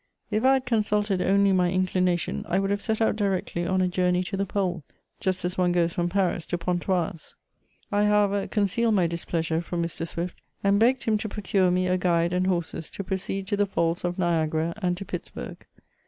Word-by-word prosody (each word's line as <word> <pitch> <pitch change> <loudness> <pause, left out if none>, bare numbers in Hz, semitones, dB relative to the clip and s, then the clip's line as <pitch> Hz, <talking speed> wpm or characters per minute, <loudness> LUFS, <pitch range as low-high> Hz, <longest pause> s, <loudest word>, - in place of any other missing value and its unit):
If 215 +2 0
I 265 +1 +6
had 265 -1 +1
consulted 210 -4 +1
only 200 +1 +3
my 180 -2 +3
inclination, 185 -1 0
I 185 - +2
would 195 0 0
have 205 0 0
set 220 -1 -1
out 220 - +3
directly 190 -4 -1
on 185 +1 +1
a - - +2
journey 180 0 +1
to 195 - -4
the 195 0 -1
Pole, 180 -4 -1 0.4
just 185 -1 -1
as 180 +1 -2
one 180 -1 +3
goes 170 -1 +1
from 175 0 0
Paris 180 -3 0
to 175 - -1
Pontoise. 175 -1 -2 0.6
I, 205 0 +3
however, 205 -1 +2
concealed 215 +2 +1
my 185 -3 +3
displeasure 165 -1 -1
from 170 0 -3
Mr. 170 -1 -4
S\\ift, 170 +2 -3 0.3
and 200 0 +3
begged 250 +3 +3
him 215 -2 +1
to 215 - -4
procure 195 -2 +1
me 180 +1 +1
a 185 0 +1
guide 170 -1 +2
and 180 +1 +1
horses 170 -3 -2
to 195 - -6
proceed 190 0 -3
to 205 - +1
the 205 0 +2
Falls 170 -3 0
of 175 0 -1
JKiagara 165 -2 0
and 180 -2 0
to 195 - -6
Pittsburg. - - -7
185 Hz, 205 wpm, -26 LUFS, 175-200 Hz, 0.6 s, I